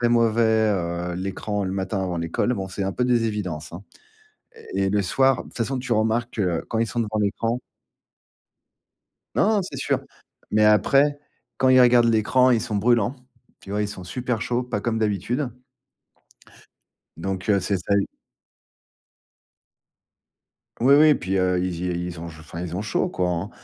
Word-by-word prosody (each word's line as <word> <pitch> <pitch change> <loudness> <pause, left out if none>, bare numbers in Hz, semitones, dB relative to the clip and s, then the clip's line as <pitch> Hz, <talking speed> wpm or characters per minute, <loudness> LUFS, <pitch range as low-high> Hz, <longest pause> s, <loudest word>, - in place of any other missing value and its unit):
très 120 - +3
mauvais, 115 -1 +3 0.3
heu, 85 -1 -2
l'écran 100 +2 -3
le 95 - -2
matin, 95 0 -2
avant 90 -2 -2
l'école. 85 +9 -1
Bon, 95 -2 -4
c'est 95 +2 -4
un 95 0 -1
peu 125 - -1
des 120 -2 +2
évidences, 90 -7 -4
hein 90 - -8 0.9
et 95 - 0
et - - +1
le 100 0 +1
soir, 130 +6 +2
de - - -14
toute - - -11
façon, 130 +3 -1
tu 125 -1 -6
remarques, 115 +2 0
heu, 90 -4 0
quand 110 - -1
ils 115 - +1
sont 120 - -1
devant 110 -1 -2
l'écran 115 +4 0 1.8
Non! 215 0 +3
C'est 185 - -7
sûr. - - 0 0.5
Mais 105 0 +3
après, 140 +7 +4 0.4
quand 130 - +3
ils 130 0 +7
regardent 120 -1 +6
l'écran, 125 +4 +3
ils 115 - +2
sont 110 -4 -3
brûlants. 120 +3 +2 0.4
Tu - - -14
vois, 105 +1 0
ils 105 - -1
sont 95 -2 -8
super 125 +1 -3
chauds, 125 +1 -1
pas 120 -4 -3
comme 115 -1 -1
d'habitude 110 - -1 1.7
donc, 95 +2 -4
heu, 100 -1 +4
c'est 95 +2 0
ça, 95 +3 -2
ils 100 - 0 2.7
Oui, 135 +3 +6
oui, 155 0 +7
puis, 95 +2 -2
heu, 90 -1 +2
ils 90 -1 -3
y 90 0 -2
ils 85 -2 -7
ont 85 - -6
je 80 -1 -11
enfin, 80 +2 -9
ils 90 -1 -4
ont 100 - -2
chaud, 105 - 0
quoi, 90 -1 -1
hein, 90 +4 -2
105 Hz, 180 wpm, -23 LUFS, 95-120 Hz, 2.7 s, ils